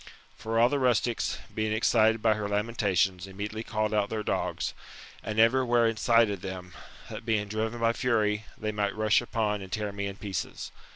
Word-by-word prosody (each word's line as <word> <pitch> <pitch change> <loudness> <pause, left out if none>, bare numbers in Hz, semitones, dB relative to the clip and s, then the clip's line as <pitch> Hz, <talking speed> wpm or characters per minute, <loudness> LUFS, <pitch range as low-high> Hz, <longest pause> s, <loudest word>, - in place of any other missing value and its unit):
For 115 +1 -3
all 120 - +6
the 140 +2 0
rustics, 120 -2 +1 0.2
being 110 0 -1
excited 110 0 +3
by 110 -1 +5
her 105 -1 -3
lamentations, 100 -4 0
immediately 105 +3 -5
called 110 -1 -1
out 105 -1 +1
their 110 -1 -3
dogs, - - -2 0.5
and 110 0 -5
every 120 +4 +5
where 120 -1 +3
incited 115 -3 +2
them, 90 -2 -7 0.4
that 110 +2 -6
being 110 -3 0
driven 110 +3 -2
by 115 0 +3
fury, 110 -4 0
they 110 0 -2
might 100 -1 -1
rush 110 +1 +3
upon 110 -4 -1
and 95 -1 -9
tear 105 -1 -2
me 100 0 -3
in 100 - -6
pieces. 100 -3 -5
110 Hz, 180 wpm, -28 LUFS, 100-115 Hz, 0.5 s, all